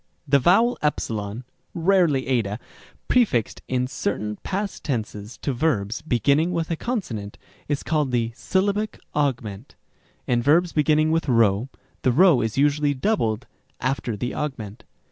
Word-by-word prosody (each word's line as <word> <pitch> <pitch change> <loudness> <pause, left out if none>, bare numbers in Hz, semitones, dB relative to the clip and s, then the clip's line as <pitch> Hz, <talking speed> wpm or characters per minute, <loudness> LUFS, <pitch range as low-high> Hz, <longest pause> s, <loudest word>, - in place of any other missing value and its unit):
The 140 0 +5
vowel 225 - +4
¢ 110 -6 -2 0.3
(rarely 170 -6 +3
ἡ), 115 -6 0 0.5
prefixed 205 - +2
in 125 0 0
certain 105 -4 -3
past 200 +1 -4
tenses 110 -5 -4
to 140 - 0
verbs 120 -6 0
beginning 145 +4 +2
with 170 -1 -2
a - - +1
consonant, 155 - -4 0.3
is 145 -1 -1
called 150 -3 0
the 120 -2 0
syllabic 200 - -1
augment. 125 -6 -2 0.5
In 120 -1 +1
verbs 165 +7 +3
beginning 155 +1 +3
with 165 -1 0
p, - - -1 0.7
the 130 - +3
p 155 -3 +5
is 110 +1 -3
usually 145 0 +2
doubled 130 - 0 0.3
after 125 -3 -2
the 120 +5 -3
augment. 110 -7 -5
140 Hz, 135 wpm, -23 LUFS, 115-165 Hz, 0.7 s, The